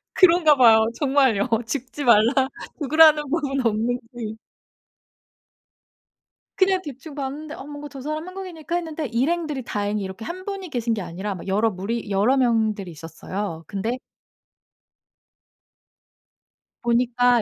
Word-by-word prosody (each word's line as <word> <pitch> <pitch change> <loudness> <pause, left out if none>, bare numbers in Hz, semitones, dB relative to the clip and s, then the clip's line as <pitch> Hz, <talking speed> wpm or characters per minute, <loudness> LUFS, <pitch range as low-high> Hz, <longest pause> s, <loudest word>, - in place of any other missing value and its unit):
그런가 340 -4 +6
봐요. 225 -3 +6
정말요. 265 -6 +2 0.2
죽지 265 +3 -4
말라 240 +3 +4 0.3
죽으라는 310 0 +6
법은 275 -5 -1
없는지. 230 0 -2 2.2
그냥 375 -1 +3
대충 285 0 -9
봤는데 290 +2 -5
'어 - - -9
뭔가 290 0 -8
저 270 -1 -9
사람 305 +4 -4
한국인일까?' 360 -4 -6
했는데 320 -3 -3
일행들이 285 +4 -1
다행히 205 -2 -2
이렇게 190 +3 -7
1 370 +7 -6
분이 390 -3 -5
계신 235 -4 -1
게 210 - -2
아니라 190 +3 -5
막 180 - -9
여러 210 +4 +2
무리 210 +4 -4
여러 215 +8 +3
명들이 220 -6 +1
있었어요. 165 +2 -6
근데 220 +5 -2 2.8
보니까 240 0 +3
250 Hz, 270 characters per minute, -23 LUFS, 220-300 Hz, 2.8 s, 그런가